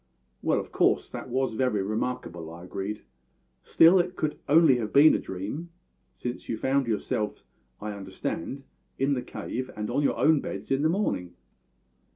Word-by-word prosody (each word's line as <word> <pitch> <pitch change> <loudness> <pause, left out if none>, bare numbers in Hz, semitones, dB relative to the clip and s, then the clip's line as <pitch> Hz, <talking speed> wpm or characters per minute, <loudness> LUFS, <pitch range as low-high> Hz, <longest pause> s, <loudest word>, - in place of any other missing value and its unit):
"Well, - - +2
of - - -7
course, - - +2
that - - -7
was 130 0 0
very 110 -4 +1
remarkable," 95 -6 -3
I 85 +1 -10
agreed. 100 +3 -5 0.6
"Still, 170 +3 +6
it 180 +1 -1
could 155 - 0
have - - -22
been 150 - +5
only 150 -7 +6 0.4
a - - 0
dream, 105 - -5 0.4
since 120 0 -6
you 115 - -1
found 135 +2 +1
yourselves, 105 -1 -2 0.4
I 105 0 -4
understand, 100 +5 -5 0.3
in 135 +2 +2
the 125 - -1
cave 130 0 -5
and 105 +2 -3
on 140 +4 +1
your 145 - +1
own 155 -1 +4
beds - - -6
in 135 +1 +2
the 155 - +3
morning." 160 - -1
125 Hz, 170 wpm, -27 LUFS, 105-140 Hz, 0.6 s, Still